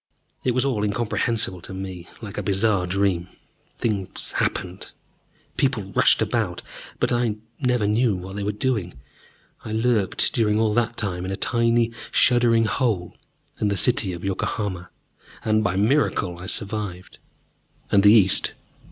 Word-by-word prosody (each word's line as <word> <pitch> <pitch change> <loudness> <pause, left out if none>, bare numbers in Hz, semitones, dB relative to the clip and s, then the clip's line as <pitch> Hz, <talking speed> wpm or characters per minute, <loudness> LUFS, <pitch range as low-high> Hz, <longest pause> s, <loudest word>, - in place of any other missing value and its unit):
It 125 -2 +1
was 130 - +2
all 120 -7 0
incomprehensible 105 -2 -1
to 95 - -7
me: 95 -2 -7
like 105 -3 -6
a - - -1
bizarre 100 -2 +1
dream, 95 -2 0 0.5
things 100 -5 -3
happened, 90 +1 -2 0.6
people 110 -8 0
rushed - - +4
about, - - -2 0.4
but - - +1
I 120 -3 +1 0.2
never 125 -5 +1
knew 110 +1 +2
what 95 +1 -7
they 105 - -3
were 100 +1 0
doing. 105 - -2 0.7
I 110 - -6
lurked 110 -2 +1
during 105 -2 +2
all 110 -1 +2
that 120 +1 0
time 90 -5 -2
in 95 - -4
a 95 - -2
tiny 115 +1 +1 0.2
shuddering 120 -2 +4
hole 105 -6 -1 0.4
under 105 -2 +1
the - - -3
city 120 -3 +2
of 85 -1 -7
Yokohama, 95 -1 -3 0.6
and 110 0 +2
by 95 -2 0
a - - -1
miracle 105 -6 +1
I 95 - -7
survived. 105 -4 -3 0.7
And 100 - +5
the 105 +1 +7
East 100 -4 +4
won. - - -34
105 Hz, 155 wpm, -23 LUFS, 95-115 Hz, 0.7 s, the